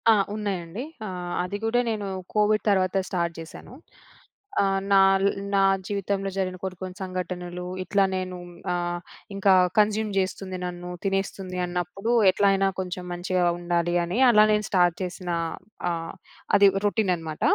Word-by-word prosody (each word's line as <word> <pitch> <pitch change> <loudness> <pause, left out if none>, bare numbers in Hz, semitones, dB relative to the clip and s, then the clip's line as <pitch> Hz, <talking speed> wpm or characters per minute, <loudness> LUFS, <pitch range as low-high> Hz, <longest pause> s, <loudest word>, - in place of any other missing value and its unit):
ఆ! - - +9 0.2
ఉన్నాయండి. 200 0 -3 0.2
ఆహ్, 180 -2 -5
అది 180 +3 -3
గూడా 240 +2 +2
నేను 210 -2 -3 0.3
కోవిడ్ 210 0 +3
తర్వాత 190 -1 +2
స్టార్ట్ 170 -2 -1
జేశాను. 165 +8 -10 0.9
ఆహ్, 195 -1 +1
నాల్ 195 0 +5 0.3
నా 195 - +4 0.3
జీవితంలో 200 -1 -2
జరిగిన 185 -1 -1
కొన్ని 185 -1 -4
కొన్ని 185 -1 -6
సంఘటనలు 180 -1 -4 0.2
ఇట్లా 200 +1 +2
నేను 185 -1 -3 0.4
ఆహ్, 175 0 -2 0.4
ఇంకా 195 -1 +4 0.3
కన్జ్యూమ్ 215 +1 +2
జేస్తుంది 185 0 -2
నన్ను, 175 0 -6 0.2
తినేస్తుంది 195 -1 -2
అన్నప్పుడు 180 +6 -2 0.2
ఎట్లైనా 195 0 +3
కొంచెం 180 -1 -4
మంచిగా 180 0 0
ఉండాలి 175 0 0
అని, 175 +6 -3
అలా 215 -2 +7
నేను 210 0 +1
స్టార్ట్ 175 -3 +3
చేసిన 180 0 -6 0.6
ఆహ్, 165 -1 -4 0.4
అది 200 0 +7 0.2
రొటీన్ 205 -2 +2
అనమాట. 160 -2 -7
185 Hz, 135 wpm, -25 LUFS, 180-200 Hz, 0.9 s, ఆ